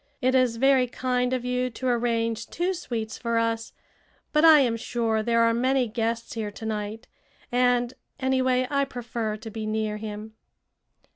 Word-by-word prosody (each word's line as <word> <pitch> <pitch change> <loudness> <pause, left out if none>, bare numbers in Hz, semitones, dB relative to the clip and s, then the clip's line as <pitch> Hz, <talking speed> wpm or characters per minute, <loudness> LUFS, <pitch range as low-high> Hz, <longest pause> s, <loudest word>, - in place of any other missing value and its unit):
It 255 0 +2
is 255 -3 +3
very 265 0 +4
kind 250 0 -1
of 255 -1 -1
you 250 0 0
to 255 +2 -5
arrange 230 -2 0
two 355 +3 -1
suites 230 -11 -4
for 235 -1 -1
us, 230 0 -1 0.6
but 300 +1 +4
I 315 -3 +9
am 240 -4 +2
sure 230 -1 -1
there 230 +1 +2
are 230 0 +4
many 255 +1 +2
guests 230 +1 -2
here 220 -2 -3
to 205 +2 -9
night 215 +1 -4 0.5
and, 245 0 +2 0.3
anyway, 260 -1 +2
I 280 -1 +2
prefer 235 -4 -4
to 220 +1 -9
be 215 0 -5
near 215 -1 -1
him." 215 0 -7
235 Hz, 165 wpm, -26 LUFS, 225-255 Hz, 0.6 s, I